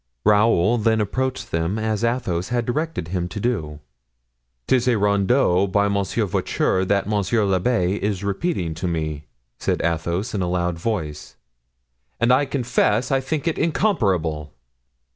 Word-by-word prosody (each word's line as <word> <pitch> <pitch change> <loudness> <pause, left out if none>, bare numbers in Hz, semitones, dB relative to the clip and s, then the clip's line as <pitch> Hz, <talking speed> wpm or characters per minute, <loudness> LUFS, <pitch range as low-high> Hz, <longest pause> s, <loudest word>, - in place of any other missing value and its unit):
Raoul 105 +1 +4
then 110 0 +2
approached 130 +5 -2
them 85 +5 -1
as 110 0 -1
Athos 115 -8 -1
had 120 -1 0
directed 150 - -2
him 90 -1 -2
to 90 - -6
do. 80 -11 -2 0.9
"'Tis 125 -1 +2
a 120 -3 +3
rondeau 100 -1 +2
by 100 +1 +2
Monsieur 100 +2 0
Voiture 95 0 0
that 100 +1 0
monsieur 105 +1 +1
l'abbé 95 0 +1
is 100 -1 -2
repeating 100 - -1
to 85 +3 -4
me." 80 -3 -3 0.3
said - - 0
Athos 85 +5 -1
in 100 - -1
a 90 - -1
loud 90 -1 -1
voice, 80 -8 -4 0.8
"and 120 +1 +4
I 140 +3 +3
confess 125 -3 +1
I 135 - +3
think 150 +4 -3
it 165 - 0
incomparable." 95 - 0
100 Hz, 145 wpm, -22 LUFS, 90-120 Hz, 0.9 s, Raoul